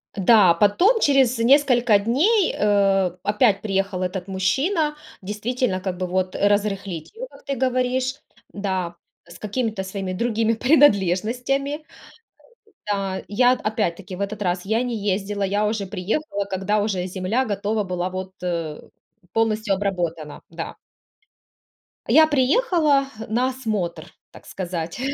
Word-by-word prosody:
Да, 195 -3 +5
потом, 345 - +3
через 265 - +3
несколько 245 -3 +4
дней, 315 - +2
э, 195 -3 +2
опять 210 -1 +2
приехал 195 -2 -1
этот 185 0 -4
мужчина, 295 - 0 0.3
действительно, 210 +1 -2
как 185 -2 -3
бы 185 - -2
вот 185 +1 -2
разрыхлить 200 -4 -1
его, - - -6
как - - -18
ты 275 -1 -2
говоришь 255 +1 0 0.3
Да, 190 -4 -3 0.3
с 170 - -13
какими-то 215 -1 -2
своими 190 -1 -4
другими 225 +2 0
принадлежностями. 250 - +2 1.1
Да. 195 -2 -2
Я, 245 +4 +4
т - - -11
опять-таки, 195 -3 -2
в - - -10
этот 205 +1 -3
раз 180 -1 -1
я 220 +4 0
не 245 -2 -3
ездила, 200 0 -2
я 205 +2 +1
уже 210 -2 -2
приехала, 200 - -2
когда 200 +2 -1
уже 190 -4 -1
земля 190 +8 -1
готова 205 0 -1
была 180 0 -3
вот, 185 0 -6
э, 165 -4 -3 0.5
полностью 220 -2 +1
обработана. 175 -6 -3
Да. 165 0 -6 1.3
Я 315 0 +6
приехала 295 - +2 0.2
на 245 +3 +1
осмотр, 205 -10 -3 0.2
так - - -15
сказать. 175 0 -5
205 Hz, 130 wpm, -22 LUFS, 190-250 Hz, 1.3 s, Я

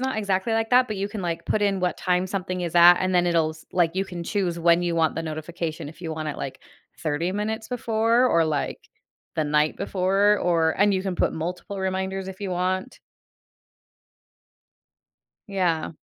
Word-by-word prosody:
not 260 -3 -1
exactly 200 +1 0
like 225 0 0
that, 250 0 +5
but 215 - -3
you 195 - -1
can 205 0 -6
like 170 -2 -3
put 215 - 0
in 200 -2 +1
what 180 -1 -1
time 180 +1 +1
something 185 -2 -3
is 170 -1 -4
at, 175 +1 +9
and 185 +1 -1
then 175 0 +3
it'll 165 -2 +2
s 155 0 -13
like, 170 -1 +2
you 195 +1 -1
can 175 -2 -6
choose 180 -3 -1
when 170 +1 +4
you 175 -1 0
want 160 -1 +2
the 165 - -3
notification, 160 0 -5
if 160 - -13
you 165 -2 -5
want 155 -1 -4
it 150 - -4
like, 135 - -6 0.4
30 160 +2 -1
minutes 220 +3 -3
before, 230 0 +2
or 170 -8 +3
like, 155 -2 -2 0.6
the 155 - 0
night 150 +1 +1
before, 200 +1 +2
or 165 -2 +2
and 205 0 +4
you 185 - -1
can 190 -2 -2
put - - +1
multiple 180 +5 -5
reminders 190 0 -2
if 190 0 -8
you 200 -2 -3
want. 185 +6 -2 2.5
Yeah. 180 -5 0
180 Hz, 195 wpm, -24 LUFS, 170-200 Hz, 2.5 s, at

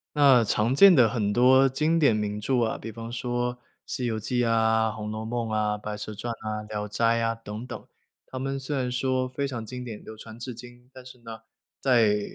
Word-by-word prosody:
那 135 -5 +6
常 110 +4 +1
见 195 +4 +8
的 120 -6 +5
很 105 -3 -1
多 130 +3 +5
经 155 +5 +1
典 140 -8 +4
名 105 -1 -2
著 125 +4 0
啊， 110 - 0
比 115 - -8
方 115 +1 -8
说 120 0 -2 0.3
《西 125 - -3
游 110 -2 -1
记》 120 +3 -1
啊、 110 -1 +2
《红 105 -1 -5
楼 110 0 -5
梦》 120 0 -2
啊， 105 -1 0
《白 105 0 -5
蛇 105 +1 -6
传》 120 +3 -5 0.2
啊， 105 0 -3
《聊 105 -1 -4
斋》 105 +3 -3 0.2
啊 115 0 0
等 115 0 -8
等， - - -9 0.4
他 130 - -8
们 135 +1 -3
虽 140 +2 -3
然 125 -1 -1
说 130 +1 0
非 140 +2 -3
常 120 -4 -5
经 125 +2 -7
典， 115 -4 -8
流 110 - -10
传 110 +1 -11
至 120 +1 -6
今。 120 +1 -13
但 130 - -12
是 130 0 -13
呢， 115 -1 -8 0.4
在 115 -6 +3
120 Hz, 235 characters per minute, -26 LUFS, 110-130 Hz, 0.4 s, 见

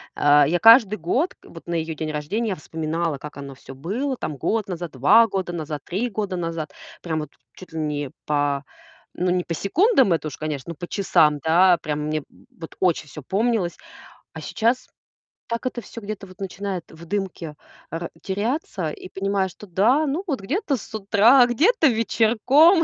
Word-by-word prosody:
а, 145 0 +5
я 175 +3 +1
каждый 225 -2 +7
год, 245 - 0
вот 165 - -13
на 170 - -2
её 160 -1 -2
день 155 0 -3
рождения, 200 +10 -2
я 190 - -1
вспоминала, 160 0 -3
как 150 +1 -10
оно 140 -1 -7
всё 135 - -12
было 225 - -2
там 150 - -4
год 215 - -1
назад, 175 -3 -5
2 145 - +5
года 190 -3 -3
назад, 150 -3 -4
3 220 +8 -2
года 205 -3 -3
назад, 165 -3 -4 0.3
прямо 160 -3 -2
от - - -23 0.3
чуть 185 -3 -13
ли 160 - -3
не 145 -3 -2
па 145 -1 0 0.5
ну, 180 +1 0
не 180 0 +1
по 170 - -4
секундам, 265 - +3
это 160 -1 -1
уж, 145 - -7
конечно, 155 -1 -4
но - - -7
по 175 +3 -7
часам, 155 -7 +3
да, 175 +4 +5
прямо 150 -1 -3
мне 155 -1 -2 0.4
вот 165 - -8
очень 175 -4 +1
всё 150 - -9
помнилось, 210 -3 0 0.6
а - - -7
сейчас 235 +3 0 0.6
так 230 +2 -3
это 250 -1 -3
всё 230 - -10
где-то 205 -1 -6
вот 185 - -16
начинает 195 -1 -4
в 165 +1 -12
дымке, 175 -5 -4 0.3
а 165 - -4
ра 170 - -5
теряться, 200 - -2
и - - -9
понимаешь, 195 -1 0
что 210 - -13
да, 230 - +3
ну 310 +8 -1
вот 270 -9 -2
где-то 300 - -1
с - - -12
утра, 225 +5 +5
где-то 315 - +3
вечерком. 245 - +4
185 Hz, 185 wpm, -23 LUFS, 155-225 Hz, 0.6 s, каждый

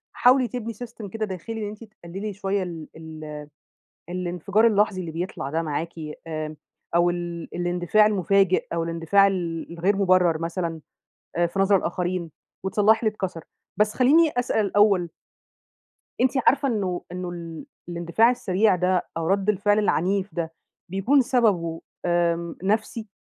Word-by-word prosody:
حاولي 250 0 +5
تبني 230 -2 -5
System 225 -2 -8
كده 220 -1 -1
داخلي، 215 +3 -6
إن 205 - -3
أنتِ 215 +2 -10 0.2
تقللي 195 +5 -5
شوية 195 0 -1
ال 165 -4 -7
ال 155 -2 -8 0.7
الإنفجار 180 +4 +1
اللحظي 210 -3 +2
اللي 165 -3 -5
بيطلع 170 -4 -4
ده 165 +3 0
معاكِ، 160 +2 -3 0.4
آمم، 155 -1 -4 0.4
أو 175 0 +4
ال 175 -1 -4
الاندفاع 175 +4 +3
المفاجئ، 195 -2 +2
أو 165 0 0
الاندفاع 165 +4 +3
ال 175 -4 -2
الغير 185 +4 +1
مبرر 185 -4 +3
مثلًا 165 -1 -3 0.6
آآ 175 - +3
في 170 +3 -6
نظر 195 +1 +5
الآخرين، 175 -2 -2 0.3
وتصلحي 210 +3 +3
اللي 220 -2 +2
اتكسر، 180 -6 -4 0.3
بس 210 0 +2
خليني 300 +5 +5
أسأل 220 -4 +1
الأول 195 -4 +3 1.1
أنتِ 255 0 +4 0.2
عارفة 280 0 +4
إنه 195 -7 -1
إنه 180 0 -4
ال 170 +2 -7 0.2
الإندفاع 175 +7 +2
السريع 210 -4 +2
ده 180 0 +1
أو 165 - -2
رَد 195 +2 +1
الفعل 205 +1 +3
العنيف 195 0 +1
ده 165 -1 -3 0.4
بيكُون 195 +10 +3
سبَبه 200 -10 +1 0.2
آمم 170 -1 +1
نَفسي. 220 +2 -1
185 Hz, 145 wpm, -24 LUFS, 170-210 Hz, 1.1 s, حاولي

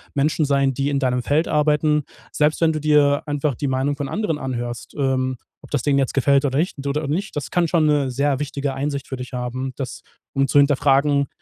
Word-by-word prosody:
Menschen 150 +3 +1
sein, 140 -1 +2
die 140 +2 -1
in 140 -1 0
deinem 125 -2 0
Feld 155 +6 +1
arbeiten. 150 0 +2 0.3
Selbst 150 +1 +2
wenn 160 -1 +4
du 155 - -2
dir 145 -1 +3
einfach 145 0 0
die 140 - -3
Meinung 135 +2 0
von 140 -1 -4
anderen 200 -8 -2
anhörst, 120 -2 -5
ähm, 130 -2 0 0.2
ob - - -14
das 145 -5 0
denen 140 -1 +2
jetzt 135 - 0
gefällt 140 +1 +3
oder 135 -1 0
nicht 155 -4 -2
oder 145 +1 -1
nicht, 180 +8 -3
das 145 - -4
kann 175 -1 +2
schon 165 -2 +2
'ne 145 -3 +2
sehr 140 +1 0
wichtige 145 -1 -3
Einsicht 140 0 -3
für 130 - -5
dich 125 +1 -8
haben, 125 +1 -3
das 130 -3 -5 0.3
um 135 0 +1
zu 140 - +1
hinterfragen, 140 0 +3
140 Hz, 215 wpm, -21 LUFS, 135-150 Hz, 0.3 s, wenn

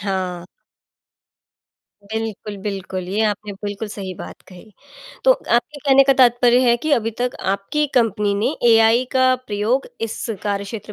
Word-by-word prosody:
हाँ। 185 -3 -3 1.7
बिल्कुल, 220 -2 -4
बिल्कुल, 190 -3 -5
ये 205 +4 0
आपने 210 -1 -2
बिल्कुल 205 +1 -4
सही 195 -2 -6
बात - - -10
कही। 185 +4 -14 0.5
तो - - +7
आपके 240 - -1
कहने 275 -1 +5
का 275 - +5
तात्पर्य 245 0 +5
है 235 - +4
कि 310 - 0
अभी 225 -4 +2
तक 250 0 -1 0.2
आपकी 295 +10 -2
कंपनी 210 -4 +1
ने 235 +9 0 0.2
एआई 225 +2 +5
का 260 -1 +4
प्रयोग 215 +6 0
इस 225 -1 -4 0.2
कार्यक्षेत्र 205 +1 -4
220 Hz, 145 wpm, -20 LUFS, 200-245 Hz, 1.7 s, तो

